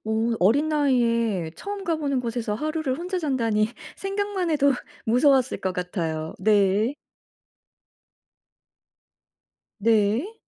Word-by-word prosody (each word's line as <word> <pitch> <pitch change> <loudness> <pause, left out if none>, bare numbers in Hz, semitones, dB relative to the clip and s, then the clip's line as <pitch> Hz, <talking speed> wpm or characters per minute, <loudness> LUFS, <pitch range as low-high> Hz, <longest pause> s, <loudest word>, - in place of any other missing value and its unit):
오 220 +1 0
어린 270 +12 +3
나이에 235 - +1
처음 405 -1 -6
가보는 295 -6 0
곳에서 230 -3 -3
하루를 305 0 -2
혼자 365 +2 -3
잔다니 230 -8 +1 0.3
생각만 390 -2 -2
해도 285 -2 +3 0.3
무서웠을 255 +2 +3
것 190 - -1
같아요. 165 -4 -3
네. 205 +4 +2 2.8
네. 225 - +2
240 Hz, 210 characters per minute, -24 LUFS, 210-310 Hz, 2.8 s, 어린